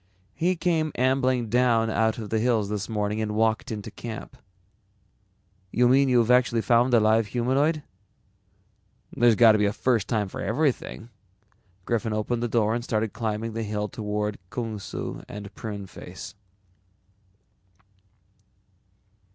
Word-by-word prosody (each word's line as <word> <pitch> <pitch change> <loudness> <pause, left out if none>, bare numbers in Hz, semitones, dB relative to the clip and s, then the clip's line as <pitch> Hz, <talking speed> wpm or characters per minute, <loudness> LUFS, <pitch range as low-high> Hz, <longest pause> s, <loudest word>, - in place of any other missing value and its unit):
"He 180 - +1
came 165 -3 0
ambling 130 -1 +1
down 115 -1 +3
out 110 0 +1
of 110 -3 -7
the 110 - +1
hills 110 -3 +1
this 105 0 -3
morning 105 0 -1
and 105 -1 -2
walked 110 +1 +1
into 105 -2 -5
camp." 115 -2 -8 1.4
"You 125 0 +3
mean 135 +2 +4
you've 120 -2 +3
actually 125 -2 +3
found 120 +2 +3
a - - +6
live 110 0 +3
humanoid?" 135 +7 +1 1.3
"There's 120 -2 +4
got 115 0 +7
to 105 - +2
be 105 - +3
a - - +1
first 115 -3 +1
time 110 -4 0
for - - -7
everything." 120 -1 -1 0.7
Griffin 115 -1 -1
opened 110 +3 -1
the 120 - 0
door 110 -2 +1
and 120 0 -2
started 110 -2 -1
climbing 110 0 -3
the 115 - -3
hill 105 -1 -2
toward 105 -1 -3
Kung 115 -2 -4
Su - - -6
and 100 -1 -8
Pruneface. 95 -4 -8
115 Hz, 140 wpm, -25 LUFS, 105-125 Hz, 1.4 s, got